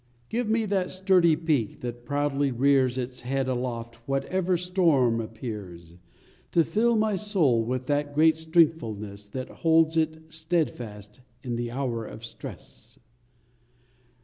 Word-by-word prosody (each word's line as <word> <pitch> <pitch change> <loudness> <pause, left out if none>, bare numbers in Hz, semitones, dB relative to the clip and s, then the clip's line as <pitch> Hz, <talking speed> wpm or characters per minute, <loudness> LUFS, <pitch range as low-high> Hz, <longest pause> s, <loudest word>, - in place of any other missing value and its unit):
Give 235 -1 -1
me 225 0 +2
the 195 -3 0
sturdy 185 -4 +3
peak 150 -9 -1
that 120 0 -6
proudly 145 -1 0
rears 130 0 +3
Its 125 0 -4
head 135 +2 -2
aloft 120 -2 -3
whatever 180 +7 0
storm 165 -10 +2
appears, 105 -7 -8 0.6
To 170 - +5
fill 230 +9 +2
my 215 -1 +2
soul 180 - +2
with 125 +2 -3
that 145 +1 -1
great 160 +1 +5
strengthfulness 115 - 0
That 130 +4 -5
holds 165 0 +2
it 160 0 -1
steadfast 125 - -3 0.2
in 120 -2 -3
the 120 0 -3
hour 120 -2 -2
of 110 +1 -9
stress - - -10
140 Hz, 130 wpm, -26 LUFS, 120-165 Hz, 0.6 s, To